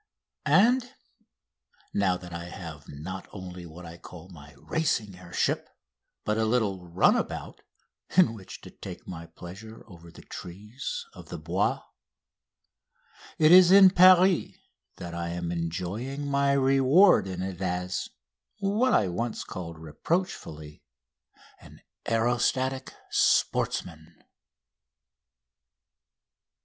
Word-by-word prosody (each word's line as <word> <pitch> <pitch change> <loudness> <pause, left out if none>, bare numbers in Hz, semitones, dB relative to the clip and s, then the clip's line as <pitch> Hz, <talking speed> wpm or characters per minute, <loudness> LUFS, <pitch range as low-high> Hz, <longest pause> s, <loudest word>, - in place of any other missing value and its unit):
And, 245 - +3 1.0
now 95 -3 +1
that 90 -1 -11
I 85 0 -6
have 80 -4 -9
not 85 +7 -7
only 90 -3 -9
what 85 +2 -11
I 85 +1 -10
call 90 +1 -12
my 75 -4 -14
racing 120 - -1
air 90 -1 -14
ship - - 0 0.6
but 105 +1 0
a 110 - +2
little 105 -6 0
"runabout," 90 +2 0 0.6
in 180 -11 +6
which 100 -5 -11
to - - -12
take - - -10
my 85 -2 -8
pleasure 100 +7 -11
over 85 -4 -14
the - - -14
trees 105 - -7
of - - -13
the - - -5
Bois, - - -1 1.5
it 155 -2 +5
is 180 0 +8
in 190 -1 +9
Paris 185 0 +5 0.4
that 85 -1 -8
I 85 0 -3
am 85 0 -4
enjoying 90 - -4
my 140 0 +2
reward 135 - +5
in 90 -1 -4
it 95 -1 -6
as 90 0 -2 0.5
what 215 +5 +1
I 100 - +3
was 90 - -5
once 115 -1 -3
called 85 -3 -7
reproachfully 80 - -4 0.8
an - - -16 0.3
"aerostatic 120 +3 0 0.2
sportsman!" 80 -1 0
95 Hz, 115 wpm, -27 LUFS, 85-140 Hz, 1.5 s, in